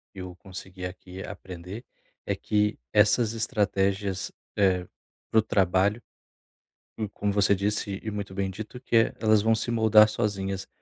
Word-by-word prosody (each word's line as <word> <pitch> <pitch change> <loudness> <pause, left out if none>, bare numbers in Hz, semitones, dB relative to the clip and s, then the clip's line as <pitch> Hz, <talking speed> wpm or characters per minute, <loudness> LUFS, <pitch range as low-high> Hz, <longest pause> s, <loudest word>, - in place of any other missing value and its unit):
e - - -8
eu 90 -1 -7
consegui 95 +1 -9
aqui 90 +1 -8
aprender, 90 +5 -8 0.4
é - - -1
que, 105 0 0 0.2
essas 110 +2 +4
estratégias, 100 -3 0 0.2
eh, 95 -3 +2 0.5
pro 110 - +5
trabalho, 100 +2 +2 1.0
e 110 -2 -3
como 100 0 -2
você 100 0 +4
disse 100 0 -2
e 110 - -3
muito 100 -2 -5
bem 95 -1 -1
dito, 110 +5 -8
que, 125 - -2
eh, 115 - +3
elas 110 -2 +4
vão 110 +1 +3
se 120 - -2
moldar 110 -2 +6
sozinhas, 100 -3 -2
100 Hz, 150 wpm, -27 LUFS, 95-110 Hz, 1.0 s, moldar